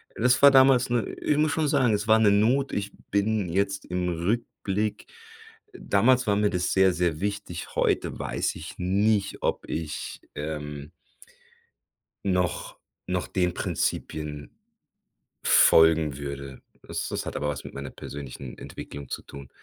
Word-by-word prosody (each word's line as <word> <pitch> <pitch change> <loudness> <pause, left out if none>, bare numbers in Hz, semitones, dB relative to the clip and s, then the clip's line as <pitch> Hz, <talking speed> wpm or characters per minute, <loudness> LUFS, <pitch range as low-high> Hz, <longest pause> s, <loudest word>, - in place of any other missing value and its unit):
das 125 +2 +3
war 140 0 +9
damals 130 -2 +5
‘ne 120 -2 +1 0.2
ich 150 - +1
muss 155 0 +2
schon 155 -1 0
sagen, 130 -6 +3
es 105 +1 -1
war 110 - +6
‘ne 105 -2 +5
Not, 120 +7 +2
ich 100 -1 -2 0.2
bin 100 0 +1
jetzt 100 +2 -1
im 90 0 -2
Rückblick 105 +3 -2 0.7
damals 125 - +2
war 100 - +3
mir 105 0 +2
das 90 -2 -1
sehr, 95 0 +5
sehr 85 -2 -1
wichtig, 100 -4 -4
heute - - 0
weiß - - -2
ich - - -8
nicht, 100 +2 +1
ob - - -1
ich, 80 -1 -4 0.2
ähm 75 -1 -5 1.3
noch 90 -2 -1 0.3
noch 90 -1 -1
den 90 -2 0
Prinzipien 75 -1 -3 0.9
folgen 80 -3 +5
würde. 70 -2 -7 0.2
Das - - -4
das - - -4
hat - - -4
aber 75 - -2
was 70 -3 -3
mit - - -9
meiner 70 -1 -6
persönlichen 70 -3 -8
Entwicklung 70 -2 -9
zu - - -4
tun. 70 -1 -11
95 Hz, 145 wpm, -26 LUFS, 75-110 Hz, 1.3 s, war